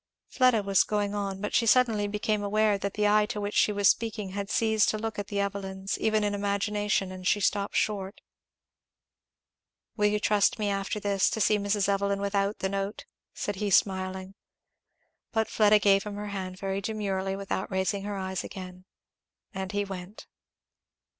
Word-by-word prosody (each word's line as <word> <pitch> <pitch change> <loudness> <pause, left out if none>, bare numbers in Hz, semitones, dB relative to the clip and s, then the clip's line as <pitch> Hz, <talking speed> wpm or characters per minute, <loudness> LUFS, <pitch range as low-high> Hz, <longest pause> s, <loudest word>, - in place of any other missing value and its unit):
Fleda 255 -5 +3
was 195 -1 +4
going 205 -1 -1
on, 195 -2 -3
but 210 - -3
she 225 +3 +3
suddenly 225 -4 +3
became 210 0 -1
aware 210 +1 +2
that 200 0 -3
the 210 0 +2
eye 210 0 +4
to 215 -2 -4
which 205 0 -3
she - - +3
was 205 -1 +2
speaking 215 -2 +1
had 200 +1 -5
ceased 220 -2 +2
to 215 - 0
look 220 -1 -4
at 200 - -4
the 205 - -3
Evelyns, 195 -1 -3
even 215 -1 +1
in 205 0 0
imagination, 205 -1 0
and 185 0 -6
she 205 - +3
stopped 200 0 0
short. 200 -2 -1 1.8
"Will 210 -2 +3
you 210 0 +1
trust 210 -1 +2
me, 210 -2 -1
after 195 +2 -2
this, 200 -1 +1
to - - -3
see 210 0 +3
Mrs. 205 0 0
Evelyn 200 0 +1
without 200 +1 0
the 190 - -1
note?" 195 +1 -3 0.3
said 205 -2 -3
he 205 +1 -1
smiling. 190 0 +1 1.0
But 220 0 +1
Fleda 215 -1 +5
gave 200 -1 +4
him 210 -1 -6
her 205 0 -5
hand 185 -2 -5
very 195 0 -3
demurely 195 -2 -2
without 195 -1 -3
raising 190 +1 -1
her 205 0 -4
eyes 190 -1 -3
again, 185 -1 -9 0.7
and 190 -1 -4
he 205 0 -1
went. 190 +1 -8
200 Hz, 180 wpm, -28 LUFS, 195-210 Hz, 1.8 s, Fleda